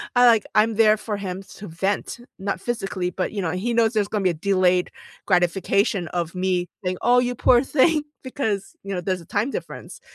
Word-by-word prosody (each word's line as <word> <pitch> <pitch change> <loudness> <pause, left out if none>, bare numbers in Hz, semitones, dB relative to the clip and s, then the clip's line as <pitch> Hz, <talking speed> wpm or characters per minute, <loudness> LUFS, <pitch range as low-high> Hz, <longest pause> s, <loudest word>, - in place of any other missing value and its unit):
I, 245 0 +6
like, 225 -4 +5
I'm 220 +1 +4
there 215 0 +5
for 210 -1 -4
him 190 -1 -5
to 205 - -9
vent, 190 +8 -2 0.2
not 195 +1 -3
physically, 195 -6 -3
but, 185 - -3
you 205 - -3
know, 165 -3 -1
he 200 +7 -2
knows 230 0 +3
there's 210 -2 +1
gonna 210 -2 -1
be 185 - +3
a - - -4
delayed 185 +1 +2 0.4
gratification 185 +1 +1
of 170 -2 -3
me 180 -1 0 0.2
saying, 180 0 -2
"Oh, 245 +1 +4
you 245 0 -1
poor 245 +1 +4
thing," 300 +3 +3 0.2
because, 250 -1 -3
you 195 - -5
know, 180 - -2
there's 185 0 -2
a - - -14
time 215 - -1
difference, - - -7
200 Hz, 205 wpm, -23 LUFS, 180-230 Hz, 0.4 s, I